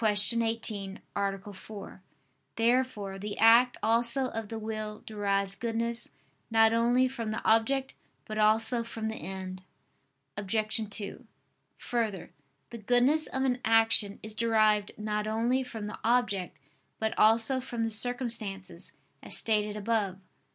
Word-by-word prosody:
18, 215 -2 +1 0.2
A. 200 0 -3
4). 200 -1 -10 0.5
Therefore 230 -5 0
the 205 +1 -5
act 235 +2 +6
also 235 +3 +2
of 225 -3 -5
the 225 - -5
will 215 -1 -5
derives 200 -2 -1
goodness 230 +2 -2 0.4
not 225 0 +4
only 240 +3 +3
from 240 -4 -5
the 215 - -4
object 260 +5 +2 0.3
but 215 0 -5
also 225 +3 +4
from 225 -1 -5
the 220 - -5
end. 185 -1 -6 0.7
Obj. 215 +1 -1
2: 210 +3 -6 0.5
Further, 220 -7 -3 0.4
the 235 - -7
goodness 245 +8 +3
of 265 - -2
an 250 -2 +1
action 225 -2 +3
is 215 0 -5
derived 215 -2 +2
not 210 0 -2
only 235 +4 +1
from 230 -5 -6
the 210 - -7
object 220 -6 0 0.4
but 220 0 -2
also 225 +4 +4
from 240 -2 -4
the 225 - -1
circumstances, 215 -6 0 0.3
as - - +2
stated 210 -1 0
above 210 -3 -1
(Q. 190 - -23
220 Hz, 135 wpm, -29 LUFS, 210-235 Hz, 0.7 s, act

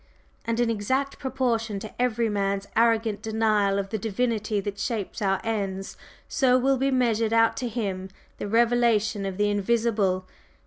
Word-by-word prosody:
And 230 0 -1
in 240 -1 +2
exact 260 +6 -1
proportion 240 -5 -1
to 215 +3 -7
every 235 -2 +1
man's 200 -1 -1
arrogant 225 -2 +2
denial 215 -3 +1
of 195 -1 -2
the 220 - -3
'Divinity 220 0 -1
that 200 0 -5
shapes 220 -5 -3
our 195 -2 +1
ends,' 195 -3 -3 0.3
so 255 -2 +3
will 265 +1 +2
be 270 +1 +2
measured 230 -4 +1
out 225 0 +4
to 250 - -2
him 195 -5 -3 0.3
the - - -3
revelation 225 -2 +2
of 190 -1 -5
the 205 0 +2
invisible. 205 -3 +1
220 Hz, 160 wpm, -26 LUFS, 200-235 Hz, 0.3 s, out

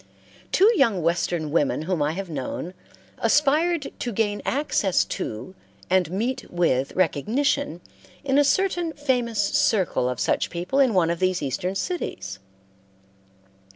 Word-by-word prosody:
Two 390 - +5
young 225 - +2
Western 170 -2 0
women 150 -1 +1
whom 175 -1 -1
I 150 +2 +1
have 195 +2 -5
known, 160 +3 -5 0.5
aspired 300 +2 +2
to 240 - -3
gain 205 -1 -1
access 255 - +1
to 110 +12 -5 0.4
and 185 -3 +3
meet 230 +8 -3
with 140 -7 +1
recognition 210 - 0 0.4
in 275 0 +2
a - - +6
certain 350 +1 +1
famous 250 -7 -1
circle 205 - +2
of 125 - -4
such - - 0
people 175 +11 -2
in 255 -6 +4
one 170 -2 +3
of 170 - -3
these 185 -3 0
Eastern 180 +8 -2
cities. 95 - -4
195 Hz, 135 wpm, -24 LUFS, 170-275 Hz, 0.5 s, a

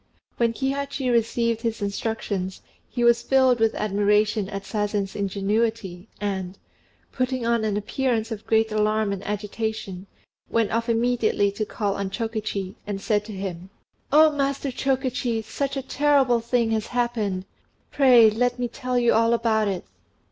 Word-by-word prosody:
When 235 -1 +2
Kihachi 275 +1 -2
received 230 0 +1
his 230 -2 -2
instructions, 200 -2 -3 0.3
he 240 - -2
was 235 0 +5
filled 260 -2 +3
with 225 0 +2
admiration 210 0 +1
at 195 -1 -5
Sazen's 205 -2 -2
ingenuity, 200 -1 -1
and, 195 -2 -3 0.5
putting 255 -1 -1
on 235 -1 +1
an 210 -2 0
appearance 230 +1 -1
of 220 -1 -6
great 220 0 +2
alarm 215 -1 +1
and 195 0 -6
agitation, 210 -2 -4 0.4
went 230 -2 +1
off 230 +1 -1
immediately 230 -3 +2
to 210 +1 -3
call 205 -3 -2
on 200 -1 -2
Chokichi, 215 -3 -3
and 200 -1 -3
said 210 0 0
to 220 - -8
him 190 -2 -6 0.4
"Oh, 310 +2 +7
Master 275 -1 -1
Chokichi, 255 -3 -1
such 275 +5 -3
a 270 - -3
terrible 270 -3 +3
thing 235 0 0
has 220 -1 -1
happened! 220 -6 -1 0.5
Pray, 245 -6 +6
let 245 +3 0
me 245 -1 -1
tell 250 +1 -3
you 240 -1 +3
all 230 +1 +3
about 220 -2 +1
it." 190 -3 -3
225 Hz, 150 wpm, -24 LUFS, 205-245 Hz, 0.5 s, Oh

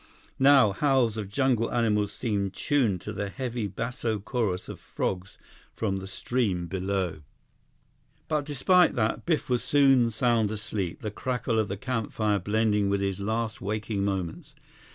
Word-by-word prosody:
Now, 135 -6 +6
howls 130 -1 +2
of 105 -3 -4
jungle 120 0 +1
animals 105 -4 +1
seemed 100 -5 -2
tuned 115 -11 +1
to 105 - -6
the 100 0 -3
heavy 120 -2 -3
basso 115 +2 -3
chorus 105 -3 -2
of - - -8
frogs 95 0 -4 0.4
from 100 -3 -1
the 95 0 -6
stream 95 -2 -1
below. 95 -2 -2 1.1
But 150 -2 0
despite 165 +5 +3
that, 110 +5 -1
Biff 160 -3 +1
was 125 -2 0
soon 135 -4 +4
sound 115 -1 +1
asleep, 105 -4 -4
the 105 - -3
crackle 120 -1 -1
of 110 - +1
the 100 - -4
campfire 110 -3 -1
blending 105 -1 +1
with 100 0 +1
his 100 -1 -1
last 110 +2 -2
waking 105 0 -2
moments. 95 -4 -3
110 Hz, 150 wpm, -27 LUFS, 100-125 Hz, 1.1 s, Now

